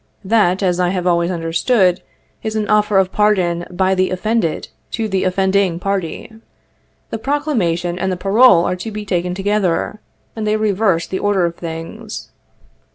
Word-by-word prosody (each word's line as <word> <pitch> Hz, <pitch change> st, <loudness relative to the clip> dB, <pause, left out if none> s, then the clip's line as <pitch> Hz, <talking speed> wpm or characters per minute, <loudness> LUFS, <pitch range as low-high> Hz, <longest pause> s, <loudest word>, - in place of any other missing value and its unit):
That, 195 Hz, -3 st, +2 dB
as 180 Hz, -1 st, +1 dB
I 180 Hz, -1 st, +2 dB
have 180 Hz, -1 st, -2 dB
always 170 Hz, -1 st, +2 dB
understood, 180 Hz, +3 st, +1 dB, 0.4 s
is 220 Hz, 0 st, -4 dB
an 215 Hz, -1 st, -1 dB
offer 210 Hz, -1 st, +3 dB
of 190 Hz, -1 st, +2 dB
pardon 185 Hz, -5 st, +1 dB
by 190 Hz, +1 st, +1 dB
the 185 Hz, 0 st, +1 dB
offended 185 Hz, -2 st, -1 dB, 0.2 s
to 225 Hz, -2 st, -1 dB
the 195 Hz, -2 st, 0 dB
offending 190 Hz, -1 st, +1 dB
party. 195 Hz, 0 st, -3 dB, 0.8 s
The 225 Hz, -, -3 dB
proclamation 210 Hz, -, -1 dB
and 190 Hz, +1 st, -1 dB
the 185 Hz, -, -2 dB
parole 195 Hz, -1 st, +5 dB
are -, -, 0 dB
to 205 Hz, +5 st, -5 dB
be 210 Hz, -1 st, -6 dB
taken 180 Hz, -2 st, -1 dB
together, 200 Hz, 0 st, 0 dB, 0.4 s
and 220 Hz, -1 st, -3 dB
they 215 Hz, 0 st, +2 dB
reverse 200 Hz, -5 st, +1 dB
the 190 Hz, -, -4 dB
order 200 Hz, -3 st, +1 dB
of 170 Hz, -, -2 dB
things. 165 Hz, -1 st, -7 dB
190 Hz, 160 wpm, -18 LUFS, 175-210 Hz, 0.8 s, parole